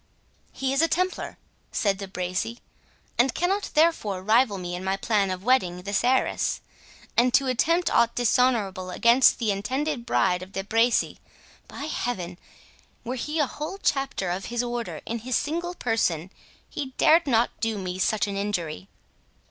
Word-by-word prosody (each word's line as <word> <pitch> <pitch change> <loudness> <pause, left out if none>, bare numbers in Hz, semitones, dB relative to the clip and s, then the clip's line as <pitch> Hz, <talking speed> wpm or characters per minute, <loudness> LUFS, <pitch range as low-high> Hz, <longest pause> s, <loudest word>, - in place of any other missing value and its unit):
"He 270 0 -2
is 275 - +3
a 330 - +4
Templar," 365 +3 -1 0.3
said 200 -3 0
De 195 - -5
Bracy, 185 +5 -3 0.6
"and 245 0 +3
cannot 385 +4 0
therefore 260 - +2
rival 220 0 +3
me 175 -1 -5
in 180 +1 -5
my 190 +1 0
plan 200 -1 +1
of 185 0 -4
wedding 185 -8 +2
this 200 +2 0
heiress;—and 250 -1 0
to 275 - +4
attempt 330 +8 +1
aught 235 0 +3
dishonourable 225 -6 +1
against 235 +7 +5
the 225 -4 0
intended 260 +7 -2
bride 180 -5 +2
of 185 +2 -10
De 195 - -3
Bracy—By 230 +5 -2
Heaven! 190 - -3 0.6
were 245 - -3
he 300 +5 -3
a 295 - +3
whole 305 +8 -6
Chapter 270 - -1
of 185 +2 -3
his 240 +1 -2
Order 240 -1 -4
in 230 +1 -3
his 245 +2 -2
single 345 +4 -2
person, 190 - 0 0.4
he 265 -2 -6
dared 330 0 +5
not 235 -2 +3
do 225 -1 -1
me 185 -1 -4
such 215 +2 +1
an 200 -1 -4
injury!" 195 -3 -3
235 Hz, 155 wpm, -25 LUFS, 195-265 Hz, 0.6 s, against